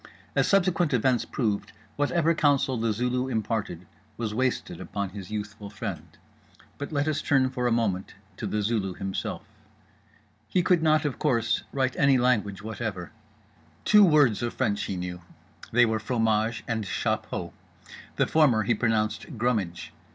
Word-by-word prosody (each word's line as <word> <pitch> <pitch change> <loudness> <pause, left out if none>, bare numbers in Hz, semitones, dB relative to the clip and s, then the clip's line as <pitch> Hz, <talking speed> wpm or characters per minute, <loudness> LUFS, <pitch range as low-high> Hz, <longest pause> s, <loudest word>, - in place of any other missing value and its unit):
As - - +3
subsequent 175 -6 +2
events 125 0 +2
proved, 105 -6 -2 0.2
whatever 165 +3 +2
counsel 145 -4 +2
The 115 -1 0
Zulu 125 +3 -1
imparted 110 -7 -2 0.3
was 110 -3 -3
wasted 130 +2 -1
upon 100 -1 -3
his 95 -2 -8
youthful 105 -1 -6
friend. 100 - -7 0.6
But 145 - -5
let 145 0 0
us 155 -2 0
turn 130 -2 +2
for 125 -2 -1
a - - +1
moment 105 -5 -1 0.2
to - - -4
The 105 -1 -1
Zulu 100 -4 -1
himself. 95 0 -4 1.0
He 180 - +1
could 175 -1 +3
not, 155 -1 +3
of 145 - -2
course, 120 -5 +1
write 130 -2 0
any 140 -1 +5
language 105 -6 +1
whatever. 105 -5 -5 0.7
Two 210 -1 +7
words 150 - +4
of 120 -1 -3
French 105 -5 0
he 95 - -3
knew: 90 0 -5 0.5
they 120 +1 +5
were 110 -1 0
fromage 110 0 0
and 115 -2 -1
chapeau. 95 -3 -2 0.6
The - - +2
former 135 -9 +3
he 120 - +2
pronounced 110 +3 -1
"grumidge." 105 -7 -1
115 Hz, 150 wpm, -27 LUFS, 105-135 Hz, 1.0 s, Two